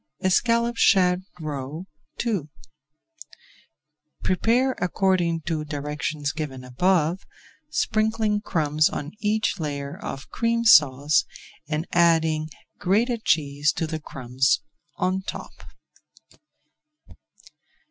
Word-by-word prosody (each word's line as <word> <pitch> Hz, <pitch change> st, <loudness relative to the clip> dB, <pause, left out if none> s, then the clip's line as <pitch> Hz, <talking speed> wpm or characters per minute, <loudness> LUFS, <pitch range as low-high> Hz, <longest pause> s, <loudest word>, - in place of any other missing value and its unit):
ESCALLOPED 235 Hz, +5 st, +2 dB
SHAD 180 Hz, -3 st, +4 dB, 0.2 s
ROE 150 Hz, +2 st, -5 dB, 0.4 s
II 195 Hz, -11 st, -1 dB, 1.7 s
Prepare 235 Hz, +8 st, +2 dB
according 180 Hz, -2 st, +1 dB
to 160 Hz, -1 st, -2 dB
directions 150 Hz, 0 st, -3 dB
given 145 Hz, -5 st, -5 dB
above, 170 Hz, +6 st, +1 dB, 0.5 s
sprinkling 215 Hz, -1 st, 0 dB
crumbs 155 Hz, -5 st, +1 dB
on 145 Hz, +1 st, -5 dB
each 210 Hz, -1 st, 0 dB
layer 140 Hz, -2 st, -4 dB
of 135 Hz, -, -7 dB
Cream 230 Hz, 0 st, 0 dB
Sauce, 145 Hz, -, +5 dB, 0.4 s
and 155 Hz, +1 st, -2 dB
adding 160 Hz, -2 st, +3 dB, 0.3 s
grated 220 Hz, +5 st, +1 dB
cheese 145 Hz, -1 st, +2 dB
to 165 Hz, -, -2 dB
the 160 Hz, 0 st, -4 dB
crumbs 130 Hz, -1 st, 0 dB, 0.4 s
on 185 Hz, +1 st, 0 dB
top. -, -, -8 dB
165 Hz, 90 wpm, -24 LUFS, 150-200 Hz, 1.7 s, Sauce